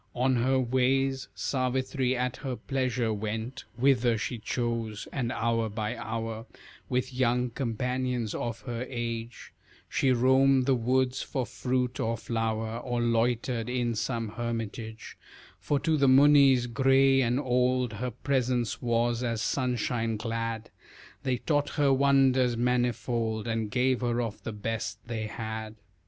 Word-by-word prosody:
On 130 +1 +2
her 130 +3 +2
ways 130 +1 +1
Savitri 130 0 0
at 125 +1 -1
her 135 -3 -4
pleasure 125 -4 -1
went 110 +5 -4
Whither 120 -2 +3
she 115 +2 -3
chose, 115 -2 -3
and 120 -3 -1
hour 115 -2 0
by 110 +2 -3
hour 115 0 -4 0.4
With 130 +1 -1
young 125 -1 +1
companions 125 -1 -2
of 115 -2 -4
her 120 +2 -4
age, 115 -1 -5 0.3
She 135 - +1
roamed 130 +1 +4
the 135 - +3
woods 130 +2 +1
for 130 -4 -2
fruit 125 0 -2
or 115 +1 0
flower, 115 0 -2
Or 120 -1 -2
loitered 120 0 0
in 120 -1 0
some 115 0 -2
hermitage, 115 -1 -5 0.4
For 145 - 0
to 160 -2 +2
the 140 -1 +3
Munis 135 -2 +6
gray 135 +2 +4
and 125 +1 +1
old 125 -2 +1
Her 125 +4 -3
presence 125 -1 -1
was 120 0 +1
as 115 -2 -1
sunshine 120 -3 -1
glad, 115 0 -3 0.5
They 130 -2 0
taught 145 +2 0
her 140 -2 +4
wonders 135 -3 +3
manifold 120 -2 0
And 110 -2 -1
gave 125 +2 +1
her 120 -1 0
of 115 -3 -3
the 110 - -5
best 110 +1 -3
they 110 -2 -3
had. 110 0 -5
120 Hz, 140 wpm, -28 LUFS, 115-130 Hz, 0.5 s, Munis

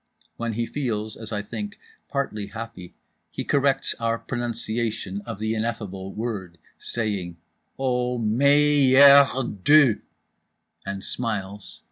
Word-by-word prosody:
When 115 -1 -3
he 115 +2 -1
feels, 110 -6 -3
as 110 -1 -9
I 105 -1 -2
think, 205 - -6 0.3
partly 110 -7 -2
happy, 110 -5 -9 0.3
he - - -5
corrects 140 -1 +1
our 115 0 0
pronunciation 115 -4 -3
of 115 -3 -5
the 110 +1 -1
ineffable 105 -4 -4
Word—saying 95 -2 -4 0.4
"O, 125 -2 0
May 140 +4 +4
err 140 0 +9 0.4
DE!" 145 -6 +6 0.9
and 100 0 -4
smiles. 105 -4 -4
115 Hz, 110 wpm, -24 LUFS, 105-130 Hz, 0.9 s, err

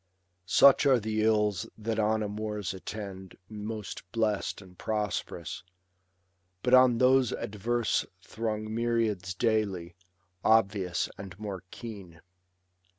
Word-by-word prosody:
Such 140 +10 +6
are 130 -3 +5
the 110 0 -1
ills 105 -4 +2
that 110 0 -2
on 110 0 +2
amours 105 -3 -3
attend 95 -1 -7
Most 105 -1 -6
blest 110 -3 0
and 95 -2 -15
prosperous; 105 +1 -3 1.0
but 125 - +1
on 130 -2 +7
those 130 0 +4
adverse 110 +2 -1 0.2
Throng 110 -1 -3
myriads 110 -5 0
daily, 100 -6 0 0.5
obvious 100 -5 +2
and 95 -3 -8
more 100 -3 -6
keen. 100 -8 -9
105 Hz, 105 wpm, -29 LUFS, 100-115 Hz, 1.0 s, on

